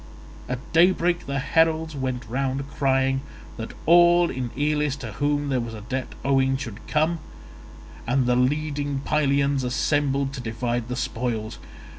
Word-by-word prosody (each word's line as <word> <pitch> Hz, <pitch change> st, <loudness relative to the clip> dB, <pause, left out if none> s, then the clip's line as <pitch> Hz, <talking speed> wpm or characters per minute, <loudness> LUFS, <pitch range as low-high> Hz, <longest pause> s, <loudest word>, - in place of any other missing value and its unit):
At 125 Hz, -, -1 dB, 0.2 s
daybreak 175 Hz, 0 st, +3 dB
the 140 Hz, 0 st, -2 dB
heralds 160 Hz, +2 st, +1 dB
went 130 Hz, -2 st, -3 dB
round 135 Hz, +3 st, -2 dB
crying 135 Hz, -1 st, +1 dB, 0.4 s
that 115 Hz, -1 st, -6 dB
all 175 Hz, +1 st, +6 dB
in 125 Hz, -1 st, -3 dB
Elis 150 Hz, -1 st, +1 dB
to 120 Hz, -6 st, -7 dB
whom 145 Hz, +5 st, 0 dB
there 130 Hz, -2 st, +1 dB
was 115 Hz, -1 st, -6 dB
a 105 Hz, -, -8 dB
debt 130 Hz, +4 st, -4 dB
owing 135 Hz, -1 st, +3 dB
should 115 Hz, -5 st, -8 dB
come; 160 Hz, +2 st, +1 dB, 0.9 s
and 130 Hz, +1 st, +2 dB
the 125 Hz, 0 st, +2 dB
leading 145 Hz, +1 st, 0 dB
Pylians 140 Hz, -2 st, +2 dB
assembled 140 Hz, +2 st, 0 dB
to 130 Hz, -, -5 dB
divide 120 Hz, 0 st, -2 dB
the 125 Hz, -, -3 dB
spoils. 115 Hz, -3 st, -3 dB
135 Hz, 145 wpm, -24 LUFS, 125-150 Hz, 0.9 s, all